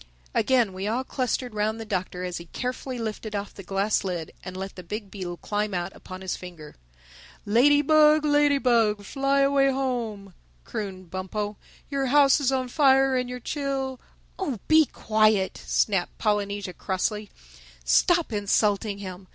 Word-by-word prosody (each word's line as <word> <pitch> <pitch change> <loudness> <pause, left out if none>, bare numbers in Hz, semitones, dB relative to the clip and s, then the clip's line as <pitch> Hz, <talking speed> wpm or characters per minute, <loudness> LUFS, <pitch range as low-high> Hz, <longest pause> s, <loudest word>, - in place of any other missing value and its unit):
Again 245 -7 +2
we 190 +2 -4
all 235 +4 0
clustered 250 -2 -2
round 215 +1 -1
the 225 - -6
Doctor 185 -3 -3
as 180 -1 -3
he 170 - -10
carefully 250 - -4
lifted 220 -1 -4
off 200 0 -4
the - - -9
glass 195 +3 0
lid 175 -4 -4
and 185 0 -7
let 195 +1 -6
the 185 - -8
big 205 +3 -6
beetle 180 -3 -5
climb 210 0 -2
out 175 -1 -3
upon 185 0 -10
his 190 -1 -3
finger. 170 -5 -10 0.7
"Ladybug, 295 +6 +5
Ladybug, 255 -8 +3
fly 275 +5 +1
away 275 0 +4
home!" 235 -7 -3 0.3
crooned 185 - -6
Bumpo. 205 +3 -3 0.4
"Your 275 -1 0
house 280 +1 +5
is 270 -2 +1
on 260 -1 0
fire 270 -1 +4
and 250 -1 -1
your 250 0 -5
chil—" 270 -1 -3 0.4
"Oh, 290 - -2
be 315 0 +6
quiet!" 215 -5 +1
snapped 195 -4 +1
Polynesia 205 -3 -1
crossly. 210 +3 -2 0.6
"Stop 340 - +3
insulting 205 0 +1
him! 185 -1 -8
215 Hz, 150 wpm, -26 LUFS, 195-265 Hz, 0.7 s, be